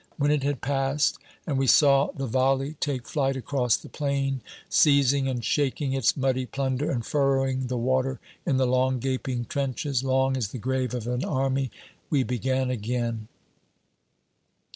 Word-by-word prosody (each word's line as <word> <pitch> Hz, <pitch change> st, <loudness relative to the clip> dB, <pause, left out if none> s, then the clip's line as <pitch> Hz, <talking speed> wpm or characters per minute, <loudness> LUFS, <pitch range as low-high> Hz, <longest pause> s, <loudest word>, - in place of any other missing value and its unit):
When 145 Hz, 0 st, +2 dB
it 150 Hz, -1 st, +2 dB
had 140 Hz, -1 st, -1 dB
passed, 135 Hz, +1 st, 0 dB, 0.3 s
and 140 Hz, -5 st, -1 dB
we 135 Hz, -, +1 dB
saw 140 Hz, 0 st, +5 dB
the 135 Hz, -, -4 dB
volley 135 Hz, +3 st, +1 dB
take 135 Hz, -4 st, -2 dB
flight 135 Hz, -3 st, 0 dB
across 130 Hz, -2 st, +1 dB
the -, -, -12 dB
plain, 140 Hz, -2 st, -1 dB, 0.3 s
seizing 140 Hz, -2 st, +4 dB
and 125 Hz, -4 st, -2 dB
shaking 140 Hz, 0 st, 0 dB
its 130 Hz, -2 st, +2 dB
muddy 130 Hz, -1 st, 0 dB
plunder 135 Hz, +2 st, -1 dB
and 120 Hz, -4 st, -2 dB
furrowing 135 Hz, -2 st, +1 dB
the 125 Hz, 0 st, -2 dB
water 130 Hz, +1 st, 0 dB, 0.2 s
in 140 Hz, -6 st, +1 dB
the 130 Hz, -, +3 dB
long 130 Hz, +1 st, +2 dB
gaping 130 Hz, -1 st, -2 dB
trenches 135 Hz, 0 st, -2 dB
long 130 Hz, 0 st, +2 dB
as 125 Hz, -5 st, -1 dB
the 105 Hz, -, -7 dB
grave 130 Hz, +1 st, -1 dB
of 120 Hz, -3 st, -4 dB
an 125 Hz, +2 st, -2 dB
army 135 Hz, -1 st, 0 dB, 0.4 s
we 140 Hz, -4 st, +2 dB
began 130 Hz, +1 st, -1 dB
again. 115 Hz, -1 st, -2 dB
130 Hz, 160 wpm, -26 LUFS, 125-135 Hz, 0.4 s, saw